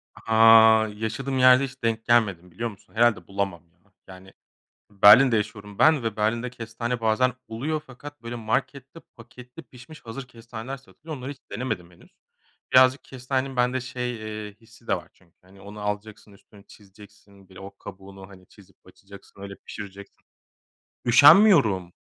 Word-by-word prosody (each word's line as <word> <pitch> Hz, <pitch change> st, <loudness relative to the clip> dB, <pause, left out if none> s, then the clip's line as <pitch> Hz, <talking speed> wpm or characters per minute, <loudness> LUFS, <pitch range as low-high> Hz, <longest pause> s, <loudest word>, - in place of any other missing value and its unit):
Ha, 110 Hz, 0 st, +5 dB
yaşadığım 125 Hz, +5 st, -4 dB
yerde 130 Hz, +1 st, +6 dB
hiç 130 Hz, -2 st, -8 dB
denk 115 Hz, -1 st, -2 dB
gelmedim, 100 Hz, -7 st, +1 dB
biliyor 115 Hz, +7 st, -4 dB
musun? 100 Hz, -3 st, -18 dB
Herhâlde 110 Hz, -7 st, +2 dB
bulamam, 100 Hz, -3 st, -4 dB
ya. -, -, -39 dB, 0.3 s
Yani, 95 Hz, 0 st, -14 dB, 0.6 s
Berlin'de 110 Hz, +5 st, +6 dB
yaşıyorum 105 Hz, -1 st, -6 dB
ben 155 Hz, -5 st, +4 dB
ve 115 Hz, -2 st, -3 dB
Berlin'de 115 Hz, +3 st, -1 dB
kestane 120 Hz, 0 st, -6 dB
bazen 115 Hz, +3 st, +1 dB
oluyor 145 Hz, +8 st, -4 dB
fakat, 145 Hz, +3 st, -12 dB
böyle, 115 Hz, +1 st, -6 dB
markette 130 Hz, +6 st, -4 dB, 0.2 s
paketli 125 Hz, +2 st, -14 dB
pişmiş 130 Hz, +5 st, -15 dB
hazır 125 Hz, +3 st, -8 dB
kestaneler 115 Hz, +2 st, -9 dB
satılıyor. 150 Hz, +3 st, -11 dB
Onları 130 Hz, +2 st, -7 dB
hiç 140 Hz, -, -12 dB
denemedim 100 Hz, -6 st, -5 dB
henüz. 85 Hz, -, -21 dB, 0.6 s
Birazcık 130 Hz, +1 st, +5 dB
kestanenin 130 Hz, +1 st, -4 dB
bende 125 Hz, +1 st, 0 dB
şey, 125 Hz, -1 st, -5 dB, 0.3 s
eee, 105 Hz, -, -14 dB
hissi 115 Hz, +1 st, -21 dB
de -, -, +1 dB
var 90 Hz, -, -10 dB
çünkü, 85 Hz, -3 st, -30 dB
hani, 95 Hz, +2 st, -20 dB
onu 105 Hz, +1 st, -11 dB
alacaksın, 105 Hz, 0 st, -6 dB
üstünü 100 Hz, 0 st, -20 dB
çizeceksin, 100 Hz, -1 st, -19 dB
bir 95 Hz, -, -16 dB
o 100 Hz, +1 st, -12 dB
kabuğunu, 95 Hz, 0 st, -12 dB
hani, 95 Hz, -2 st, -17 dB
çizip 100 Hz, -2 st, -21 dB
açacaksın, 100 Hz, +1 st, -17 dB
öyle 100 Hz, 0 st, -9 dB
pişireceksin. 100 Hz, -1 st, -11 dB, 0.8 s
Üşenmiyorum. 125 Hz, -, +5 dB
110 Hz, 150 wpm, -24 LUFS, 100-125 Hz, 0.8 s, yerde